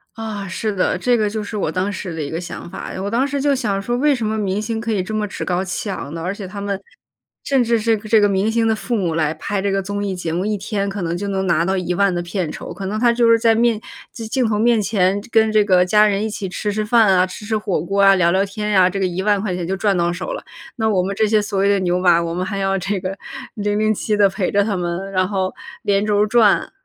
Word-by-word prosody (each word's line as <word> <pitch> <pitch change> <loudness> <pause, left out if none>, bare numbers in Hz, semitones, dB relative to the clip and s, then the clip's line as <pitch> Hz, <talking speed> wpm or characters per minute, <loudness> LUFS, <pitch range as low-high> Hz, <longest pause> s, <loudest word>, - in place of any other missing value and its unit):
啊， 215 -3 -5
是 205 +3 -2
的， 185 -1 +1
这 245 +6 +2
个 215 -2 +1
就 215 0 -4
是 210 - -7
我 175 -6 -1
当 185 +3 -1
时 190 -3 -5
的 160 - -4
一 145 - -4
个 165 +2 -4
想 170 - -7
法。 - - -7
我 200 - -2
当 250 +5 +1
时 280 0 -2
就 285 0 +2
想 210 -7 -1
说： 240 +4 -2
“为 285 +2 +3
什 235 - -3
么 215 +1 -1
明 200 -1 -1
星 225 0 -3
可 230 - -3
以 195 -4 0
这 215 - -6
么 215 -1 -1
趾 - - -6
高 180 0 0
气 190 +2 -4
昂 145 - -6
呢？” 165 - -5
而 185 +2 -2
且 200 -2 -7
他 200 +2 -8
们 200 -1 -3 0.6
甚 270 -3 +2
至 230 0 +2
是 225 +1 +2
这 215 +1 +2
个 205 - +4
明 200 +3 +1
星 230 0 +1
的 220 - +2
父 235 +2 -3
母 175 -5 -1
来 155 -2 +1
拍 200 +5 -3
这 200 0 0
个 195 - +1
综 205 +1 -3
艺 195 -2 -2
节 165 -2 -4
目， 180 +2 -1
1 210 0 -1
天 200 0 -2
可 195 -2 -4
能 170 +1 -2
就 200 +3 -4
能 190 -1 -1
拿 170 -2 +2
到 190 +1 0
10000 180 +2 +1
的 175 - -1
片 175 -2 -3
酬。 - - -7
可 190 +2 -6
能 215 +2 -2
他 235 0 +4
就 235 -1 +3
是 230 - +6
在 225 0 +3
面 230 -1 +2 0.3
镜 235 +2 -2
头 210 -1 0
面 230 0 +3
前 195 -1 +1
跟 220 -1 +4
这 215 -1 +4
个 185 -3 +4
家 210 +3 +5
人 200 0 0
一 220 - 0
起 205 -3 -5
吃 205 +3 -3
吃 215 +1 -1
饭 225 0 +4
啊、 180 - +4
吃 210 +3 -9
吃 220 - -1
火 205 -5 -1
锅 195 +5 0
啊、 195 0 +7
聊 170 -2 +3
聊 190 +2 +2
天 210 +1 -3
呀， 185 -2 +5
这 195 - -4
个 190 - +1
10000 190 +3 0
块 195 -3 -2
钱 175 -2 -4
就 190 +1 -2
赚 200 -1 +1
到 175 0 +1
手 - - -4
了。 - - -6 0.3
那 220 -1 +1
我 185 -3 +2
们 195 +1 -3
这 215 +1 +2
些 215 0 +3
所 200 -2 -2
谓 200 +1 +3
的 200 - +3
牛 180 0 +1
马， 175 -2 +4
我 170 0 -2
们 180 +1 -2
还 195 +1 -4
要 195 0 0
这 195 +2 -2
个 185 +1 -4 0.4
007 210 0 0
地 200 -1 +6
陪 190 -1 -2
着 200 0 +2
他 205 -2 -1
们， 180 +2 -3
然 185 -1 +1
后 190 -2 -1 0.3
连 200 0 +2
轴 210 0 +2
转。 220 -2 +3
200 Hz, 295 characters per minute, -20 LUFS, 185-215 Hz, 0.6 s, 啊